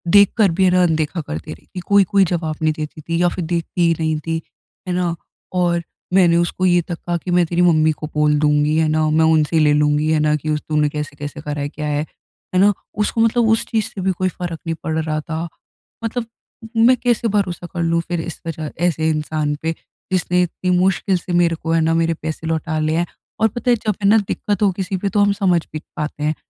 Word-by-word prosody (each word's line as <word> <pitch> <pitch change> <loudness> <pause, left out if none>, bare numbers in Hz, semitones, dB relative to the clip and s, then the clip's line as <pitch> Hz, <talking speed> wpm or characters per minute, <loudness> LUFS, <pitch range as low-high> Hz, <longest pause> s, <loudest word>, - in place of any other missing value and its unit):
देख 200 -1 +7
कर 200 -5 +4
भी, 190 +3 +1
है - - +5
ना, 180 0 +4
अनदेखा 160 0 0
करती 80 - -6
रही - - -16
कि 185 - -4
कोई-कोई 200 -1 +4
जवाब 160 -2 -2
नहीं 155 -1 +2
देती 155 0 -6
थी 165 +3 -2
या 175 - +4
फिर 175 -3 -3
देखती 170 +1 -2
ही 165 - +4
नहीं 155 -1 0
थी। 165 0 -1 0.5
है 180 - -1
ना? 175 -2 0 0.4
और 175 -1 +1 0.3
मैंने 175 -3 +5
उसको 175 +2 0
ये 175 -1 +4
तक 170 0 -6
कहा 175 0 -3
कि, 180 +2 -5
"मैं 175 -1 +4
तेरी 175 +2 0
मम्मी 160 -3 +4
को 155 - -3
बोल 150 0 +3
दूँगी। 150 0 +2
है 160 -1 +3
ना? 155 0 +1
मैं 160 +1 +3
उनसे 155 +1 +2
ले 150 -1 +4
लूँगी, 150 +1 +2
है 155 - +3
ना, 150 0 +2
कि 155 +1 -4
उस 150 0 0
तूने 150 -1 +2
कैसे-कैसे 145 0 -6
करा 150 -1 -4
है, 145 - -2
क्या 150 0 -5
है। 145 0 0 0.5
है - - +4
ना?" 205 +1 +5 0.3
उसको 225 - 0
मतलब 230 0 +3
उस 225 - +3
चीज़ 220 -3 -1
से 190 - -7
भी 190 +1 +1
कोई 185 0 +1
फ़र्क 170 -2 -6
नहीं 165 - -1
पड़ 160 0 -2
रहा 155 -1 -1
था। 160 +1 -4 0.6
मतलब 230 +1 -2 0.6
मैं 255 - +6
कैसे 240 -1 +1
भरोसा 190 -4 -1
कर 170 - -2
लूँ 165 0 +1
फिर 175 -2 -2
इस 170 - -7
वजह 155 -2 -4 0.2
ऐसे 160 -1 0
इंसान 150 -1 -1
पे, 160 +1 0 0.4
जिसने 180 0 +2
इतनी 180 +1 -3
मुश्किल 190 +1 +2
से 175 +1 -6
मेरे 170 -1 +2
को, 165 0 -4
है 165 - +3
ना, 165 +1 +2
मेरे 165 0 +2
पैसे 160 0 -4
लौटा 160 -1 -1
लिए 155 +1 0
हैं? 175 - +1 0.3
और 220 - +4
पता 240 +3 -1
है, - - +5
जब 210 -3 +1
है - - +4
ना 220 - +6
दिक्कत 205 0 -2
हो 195 - +4
किसी 190 +1 -3
पे, 200 +2 -2
तो 205 - 0
हम 205 0 +4
समझ 175 -3 +3
भी 155 - -3 0.2
पाते 150 0 -4
हैं। 155 +1 +1
165 Hz, 240 wpm, -19 LUFS, 155-185 Hz, 0.6 s, देख